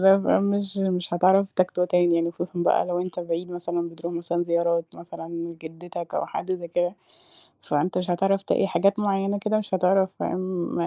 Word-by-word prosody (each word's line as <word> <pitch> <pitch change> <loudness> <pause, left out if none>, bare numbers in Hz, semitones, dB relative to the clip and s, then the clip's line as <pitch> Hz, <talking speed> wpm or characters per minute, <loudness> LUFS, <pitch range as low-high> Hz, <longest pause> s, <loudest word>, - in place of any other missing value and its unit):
ده 195 +1 +8
بقى، 195 - +3
مش 200 0 0
مش 180 -3 0
هتعرف 190 +3 +4
تاكله 180 -1 +2
تاني 175 -1 +3
يعني 170 0 +1
خصوصًا 175 +1 -5
بقى 175 -1 +2
لو 175 -1 -1
أنت 180 0 -4
بعيد 170 +1 -3
مثلًا، 175 -1 -3
بتروح 165 +1 -7
مثلًا 170 0 -1
زيارات، 170 -1 +1
مثلًا 170 -1 -9
لجدَّتك 170 +1 -7
أو - - -1
حد 185 - -3
زي 175 -2 -5
كده، 175 +2 0 0.7
فأنت 165 +5 0
مش 180 0 -2
هتعرف 195 +2 +1
ت - - -3
إيه - - +3
حاجات 195 +3 +2
معيَّنة 200 -1 0
كده، 215 +2 0
مش 215 -2 -5
هتعرف 190 +1 +3
فاهم، 185 -1 -2
180 Hz, 190 wpm, -25 LUFS, 170-195 Hz, 0.7 s, ده